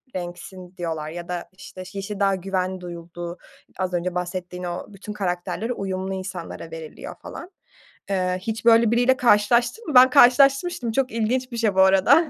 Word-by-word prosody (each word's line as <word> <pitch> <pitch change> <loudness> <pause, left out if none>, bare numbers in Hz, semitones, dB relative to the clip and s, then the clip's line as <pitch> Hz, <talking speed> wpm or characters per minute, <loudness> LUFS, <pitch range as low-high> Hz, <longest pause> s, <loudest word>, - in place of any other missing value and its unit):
renksin." 180 +1 -7
diyorlar 160 -3 -3
ya 170 +1 -7
da, 175 -1 -5
işte, 190 -1 -11
yeşil 200 +1 -5
daha 195 -1 +3
güven 185 0 -2
duyulduğu, 175 0 -7 0.4
az 185 -1 -1
önce 175 +1 -2
bahsettiğin 180 0 -4
o 175 0 -4
bütün 200 +2 -8
karakterlere 195 +4 -2
uyumlu 190 -2 -3
insanlara 185 -3 -6
veriliyor 160 -1 -8
falan. 350 +3 -9 0.6
Eee, 185 -1 0
hiç 225 +3 -4
böyle 230 -1 +6
biriyle 245 +2 +3
karşılaştın 240 - +3
mı? 300 - -3
Ben 255 +1 +9
karşılaşmıştım, 275 +1 +4
çok 265 +3 0
ilginç 250 +3 -1
bir 235 - -5
şey 220 -4 +1
bu 190 - +5
arada. 190 - +5
190 Hz, 160 wpm, -23 LUFS, 180-235 Hz, 0.6 s, Ben